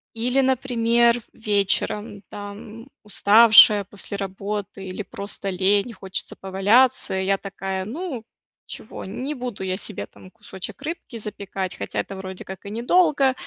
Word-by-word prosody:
Или, 245 Hz, +4 st, +1 dB
например, 235 Hz, -2 st, +2 dB
вечером, 205 Hz, 0 st, 0 dB
там, 210 Hz, +3 st, -9 dB, 0.2 s
уставшая 210 Hz, 0 st, +7 dB
после 200 Hz, 0 st, -7 dB
работы, 195 Hz, +1 st, -5 dB
или 190 Hz, +2 st, -5 dB
просто 200 Hz, 0 st, -5 dB
лень, 195 Hz, +5 st, +2 dB
хочется 190 Hz, -2 st, -4 dB
поваляться, 200 Hz, +6 st, +2 dB
и, -, -, -2 dB
я 195 Hz, +1 st, +2 dB
такая, 190 Hz, -1 st, -5 dB
ну, 270 Hz, -, -5 dB, 0.4 s
чего, -, -, -8 dB
не 255 Hz, +9 st, -4 dB
буду 245 Hz, -6 st, -5 dB
я 185 Hz, 0 st, -1 dB
себе, 205 Hz, +1 st, -4 dB
там, 185 Hz, -, -16 dB
кусочек 210 Hz, +2 st, -8 dB
рыбки 295 Hz, -6 st, -6 dB
запекать, 195 Hz, -3 st, -5 dB
хотя, -, -, -4 dB
это, 195 Hz, -, -4 dB
вроде 190 Hz, -1 st, -8 dB
как, 190 Hz, 0 st, -9 dB
и -, -, -6 dB
недолго, 275 Hz, -, +3 dB
205 Hz, 140 wpm, -23 LUFS, 195-235 Hz, 0.4 s, уставшая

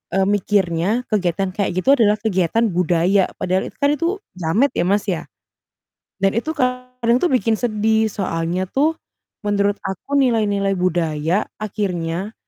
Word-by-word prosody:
eee, 195 Hz, -, +3 dB
mikirnya 205 Hz, +2 st, +1 dB
kegiatan 190 Hz, -2 st, 0 dB
kayak 200 Hz, -3 st, 0 dB
gitu 275 Hz, -, +4 dB
adalah 210 Hz, -3 st, +4 dB
kegiatan 205 Hz, +1 st, +1 dB
budaya, 180 Hz, +2 st, +2 dB
padahal 185 Hz, +1 st, 0 dB
itu 220 Hz, -, -23 dB
kan 285 Hz, -, +4 dB
itu 335 Hz, +4 st, -1 dB, 0.3 s
jamet 185 Hz, -, +1 dB
ya, -, -, +1 dB
Mas, 200 Hz, +1 st, +2 dB
ya. 175 Hz, -, -1 dB, 1.0 s
Dan 195 Hz, 0 st, +3 dB
itu 315 Hz, +7 st, -1 dB
kadang 250 Hz, -2 st, 0 dB
tuh 360 Hz, -, +2 dB
bikin 225 Hz, -3 st, +2 dB
sedih, 220 Hz, -1 st, +1 dB
soalnya 175 Hz, -2 st, -2 dB
tuh 310 Hz, +4 st, +2 dB, 0.5 s
menurut 205 Hz, 0 st, +1 dB
aku 195 Hz, +9 st, -3 dB
nilai-nilai 210 Hz, -6 st, +2 dB
budaya 170 Hz, +1 st, 0 dB, 0.2 s
akhirnya, 190 Hz, -2 st, -3 dB
200 Hz, 140 wpm, -20 LUFS, 180-230 Hz, 1.0 s, gitu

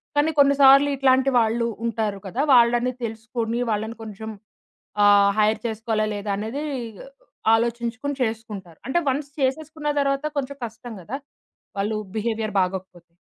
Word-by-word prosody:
కానీ 295 Hz, +2 st, +3 dB
కొన్ని 280 Hz, 0 st, +6 dB
సార్లు 275 Hz, +1 st, +7 dB
ఇట్లాంటి 265 Hz, 0 st, +3 dB
వాళ్ళు 230 Hz, +1 st, +1 dB, 0.2 s
ఉంటారు 215 Hz, -3 st, -2 dB
కదా! 240 Hz, +9 st, -2 dB
వాళ్ళని 240 Hz, +1 st, +4 dB
తెలుసుకొని 230 Hz, +1 st, -3 dB
వాళ్ళని 220 Hz, +2 st, -2 dB
కొంచెం 220 Hz, +1 st, -7 dB, 0.7 s
ఆహ్, 200 Hz, 0 st, +6 dB
హైర్ 215 Hz, +1 st, +3 dB
చేసుకోవాలా 220 Hz, -1 st, -1 dB
లేదా 205 Hz, 0 st, -4 dB
అనేది 225 Hz, +8 st, -4 dB, 0.3 s
ఇగ 220 Hz, -, -13 dB, 0.5 s
ఆలోచించుకొని 235 Hz, +4 st, -1 dB
చేసుకుంటారు. 215 Hz, -7 st, -5 dB
అంటే 305 Hz, +6 st, +2 dB
వన్స్ 280 Hz, +2 st, -1 dB
చేసేసుకున్న 300 Hz, +3 st, -2 dB
తరువాత 275 Hz, +1 st, 0 dB
కొంచెం 280 Hz, 0 st, -3 dB
కష్టం 230 Hz, +1 st, -9 dB
కదా! 245 Hz, +10 st, -5 dB, 0.6 s
వాళ్ళ 205 Hz, +2 st, -1 dB, 0.3 s
బిహేవియర్ 220 Hz, -1 st, -2 dB
బాగోకపోతే. 180 Hz, -2 st, -5 dB
230 Hz, 130 wpm, -23 LUFS, 215-265 Hz, 0.7 s, సార్లు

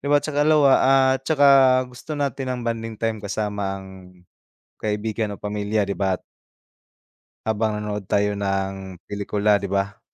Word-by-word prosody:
di -, -, -6 dB
ba' 145 Hz, -, +6 dB
tsaka 145 Hz, -1 st, -1 dB
lawa 150 Hz, -3 st, +5 dB, 0.4 s
at 135 Hz, -, -5 dB
saka 145 Hz, -3 st, +4 dB, 0.4 s
gusto 125 Hz, +5 st, -8 dB
natin 135 Hz, -2 st, -2 dB
ng 125 Hz, -1 st, -3 dB
bonding 115 Hz, -1 st, -3 dB
time 115 Hz, -1 st, -1 dB
kasama 100 Hz, -1 st, -3 dB
ang 95 Hz, -, -11 dB, 1.0 s
kaibigan 105 Hz, 0 st, -2 dB
o -, -, -13 dB
pamilya 105 Hz, +1 st, -1 dB
di 100 Hz, -, -2 dB
ba 95 Hz, -2 st, 0 dB
t -, -, -35 dB, 1.2 s
Habang 110 Hz, 0 st, 0 dB
nanonood 105 Hz, -1 st, -4 dB
tayo 100 Hz, +1 st, 0 dB
ng 95 Hz, -2 st, -3 dB
pelikula 105 Hz, 0 st, +1 dB
di 100 Hz, -, -5 dB
ba? 100 Hz, +1 st, -2 dB
105 Hz, 155 wpm, -23 LUFS, 100-115 Hz, 1.2 s, ba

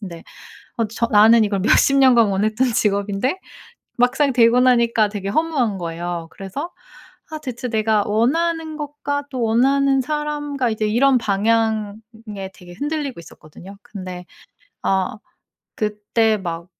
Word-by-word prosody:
근데 170 Hz, -5 st, -9 dB, 0.5 s
어 230 Hz, -, +1 dB
저 230 Hz, +2 st, -1 dB
나는 220 Hz, +2 st, +6 dB
이걸 205 Hz, -1 st, -1 dB
몇십 275 Hz, +7 st, +3 dB
년간 245 Hz, -5 st, +5 dB
원했던 215 Hz, +6 st, 0 dB
직업인데 205 Hz, -, 0 dB, 0.6 s
막상 265 Hz, +3 st, +2 dB
되고 235 Hz, 0 st, +4 dB
나니까 235 Hz, -4 st, +3 dB
되게 200 Hz, -2 st, -5 dB
허무한 270 Hz, -5 st, 0 dB
거예요. 170 Hz, 0 st, -5 dB
그래서 200 Hz, -, -7 dB, 0.6 s
아 310 Hz, -, -5 dB
대체 255 Hz, -3 st, -6 dB
내가 215 Hz, -2 st, +1 dB
원하는 315 Hz, +8 st, 0 dB
것과 285 Hz, -1 st, -4 dB
또 255 Hz, -3 st, -4 dB
원하는 270 Hz, +4 st, +2 dB
사람과 295 Hz, -2 st, -2 dB
이제 220 Hz, -1 st, -1 dB
이런 255 Hz, +4 st, +3 dB
방향에 215 Hz, -1 st, -2 dB
되게 175 Hz, -1 st, -14 dB
흔들리고 290 Hz, -, -4 dB
있었거든요. 170 Hz, +4 st, -14 dB
근데 185 Hz, -3 st, -8 dB, 0.6 s
아 195 Hz, +5 st, 0 dB, 0.6 s
그때 215 Hz, +1 st, 0 dB
막 170 Hz, -3 st, -5 dB
225 Hz, 280 characters per minute, -20 LUFS, 200-270 Hz, 0.6 s, 나는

